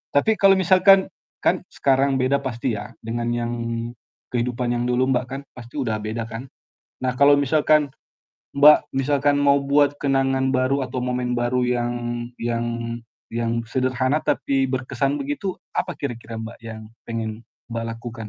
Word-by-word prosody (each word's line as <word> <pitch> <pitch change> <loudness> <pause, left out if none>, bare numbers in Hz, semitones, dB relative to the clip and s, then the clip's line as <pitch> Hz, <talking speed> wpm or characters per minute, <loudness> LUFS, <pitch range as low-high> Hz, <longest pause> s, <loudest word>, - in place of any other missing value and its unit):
Tapi 220 +10 +4
kalau 195 -1 +7
misalkan 190 +1 +6 0.5
kan - - +3
sekarang 135 0 +2
beda 135 +2 +1
pasti 120 -1 -2
ya 105 0 -5 0.2
dengan 120 +1 -2
yang 120 0 -1 0.8
kehidupan 120 0 -1
yang 120 0 -1
dulu 125 +1 +2
Mbak, 125 +1 0
kan 135 +1 -5
pasti 120 +3 -11
udah 115 -6 -1
beda 110 +2 -3
kan. 115 +4 -8 0.5
Nah 130 -1 +1
kalau 140 0 +7
misalkan 150 +1 +3 0.7
Mbak, 150 +2 +7
misalkan 145 +1 +2
mau 140 0 +4
buat 145 +1 +2
kenangan 135 -1 +1
baru 130 +1 +1
atau 130 0 -3
momen 125 -1 -1
baru 120 +1 +1 0.2
yang 120 0 -1 0.5
yang 120 0 -1 0.6
yang 115 0 -2 0.2
sederhana 130 +3 +1
tapi 135 -1 +1
berkesan 135 +2 -1
begitu, 145 +8 -3 0.2
apa 180 - 0
kira-kira 120 -6 -6
Mbak, 115 +1 -8
yang 110 -1 -8 0.2
pengen 115 -1 -4 0.3
Mbak 115 0 -4
lakukan? 115 -1 -8
130 Hz, 150 wpm, -23 LUFS, 120-140 Hz, 0.8 s, kalau